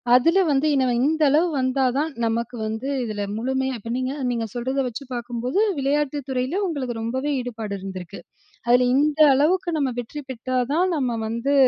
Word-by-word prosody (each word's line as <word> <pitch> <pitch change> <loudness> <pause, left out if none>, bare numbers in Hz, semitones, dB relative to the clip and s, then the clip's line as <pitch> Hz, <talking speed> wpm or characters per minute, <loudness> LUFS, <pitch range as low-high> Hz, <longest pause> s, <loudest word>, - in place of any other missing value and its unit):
அதுல 330 +9 +4
வந்து 280 +3 +2
இனவ 260 -2 +2
இந்த 315 +1 +1
அளவு 315 +5 +4
வந்தா 260 +1 +1
தான் 310 +2 0
நமக்கு 230 +2 -1
வந்து 220 +5 -3 0.2
இதுல 215 -3 -4 0.2
முழுமையா 265 +2 -1
இப்ப 230 +3 -6
நீங்க 260 +1 -2 0.2
நீங்க 230 -1 -1
சொல்லுறத 260 +3 -1
வச்சு 250 +4 -6
பாக்கும்போது, 240 - -2 0.2
விளையாட்டு 290 +1 0
துறையில 260 +10 -1
உங்களுக்கு 255 -8 -3
ரொம்பவே 260 +6 -2
ஈடுபாடு 225 -4 -4
இருந்திருக்கு. 185 -3 -7 0.5
அதுல 250 +1 +5
இந்த 300 +2 +2
அளவுக்கு 345 +5 +2
நம்ப 270 -3 0
வெற்றி 290 +5 -7
பெற்றா 255 +1 -2
தான் 355 +2 +2
நம்ப 245 -5 -1
வந்து 235 +5 0
260 Hz, 165 wpm, -23 LUFS, 235-290 Hz, 0.5 s, அதுல